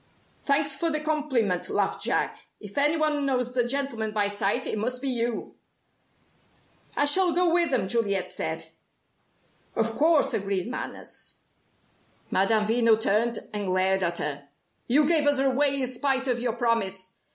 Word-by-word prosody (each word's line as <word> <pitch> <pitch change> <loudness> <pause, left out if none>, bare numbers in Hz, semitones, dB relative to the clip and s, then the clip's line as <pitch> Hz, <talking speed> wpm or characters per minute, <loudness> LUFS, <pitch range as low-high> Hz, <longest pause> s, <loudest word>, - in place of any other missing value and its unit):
"Thanks 285 0 +2
for 335 - 0
the 305 -1 +1
compliment," 280 - -1
laughed - - -1
Jack. - - -1
"If 205 -2 -11
any 295 +3 +3
one 305 -2 +1
knows 250 -3 0
the 245 -1 +1
gentleman 240 -5 -2
by 205 -1 +1
sight, 205 -1 0
it 215 - -2
must 250 +3 -2
be 275 - -3
you!" 240 -2 -1 1.4
"I 290 - +3
shall 355 +4 +4
go 350 0 +2
with 340 -2 +3
them," 240 -9 0
Juliet 200 -4 0
said. - - -5 1.1
"Of 225 0 0
course!" 310 +1 +3
agreed 195 -1 -2
Manners. 255 - -7 1.0
Madame 210 +3 +2
Veno 225 0 +3
turned 225 +2 0
and 205 -2 -2
glared 190 +1 +2
at 170 -1 -1
her. 145 -1 -4 0.4
"You 290 +5 +4
gave 310 -3 +3
us 290 -1 +3
away 275 +1 +2
in - - 0
spite 265 +1 0
of 245 -2 0
your 240 -1 -1
promise. 195 -6 -1
240 Hz, 155 wpm, -26 LUFS, 205-285 Hz, 1.4 s, shall